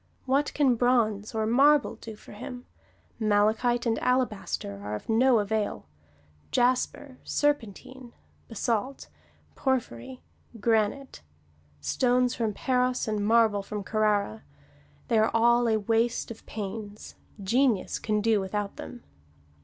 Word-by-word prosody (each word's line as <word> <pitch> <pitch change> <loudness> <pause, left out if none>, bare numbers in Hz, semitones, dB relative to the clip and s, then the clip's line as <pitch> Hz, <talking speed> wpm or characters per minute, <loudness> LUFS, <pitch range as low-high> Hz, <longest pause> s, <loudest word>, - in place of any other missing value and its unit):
What 275 +3 +1
can 280 -4 +4
bronze 225 -3 +1
or 220 0 0
marble 275 +6 +4
do 220 -1 -10
for - - -15
him? 245 +4 -8 0.5
Malachite 220 +3 +2
and 225 -1 +1
alabaster 215 - -1
are 105 +1 -4
of 105 - -8
no 240 +2 +4
avail; 210 0 -2 0.6
jasper, 255 +2 0
serpentine, 260 -2 -2 0.4
basalt, 235 +3 -2 0.4
porphyry, 255 - -3 0.4
granite: 225 +5 0 0.6
stones 250 - +1
from 225 -3 -1
Paros 250 +2 0
and 210 -1 -1
marble 220 -1 +3
from 205 +1 -6
Carrara 215 +1 0 0.7
they 230 -3 +3
are 220 - +3
all 235 +1 +4
a 220 - +3
waste 230 +3 0
of 225 - -10
pains: 210 0 -7 0.3
genius 230 +1 +1
can 210 -1 -1
do 220 -1 +2
without 200 +1 -4
them. 240 - -9
225 Hz, 120 wpm, -27 LUFS, 210-250 Hz, 0.7 s, can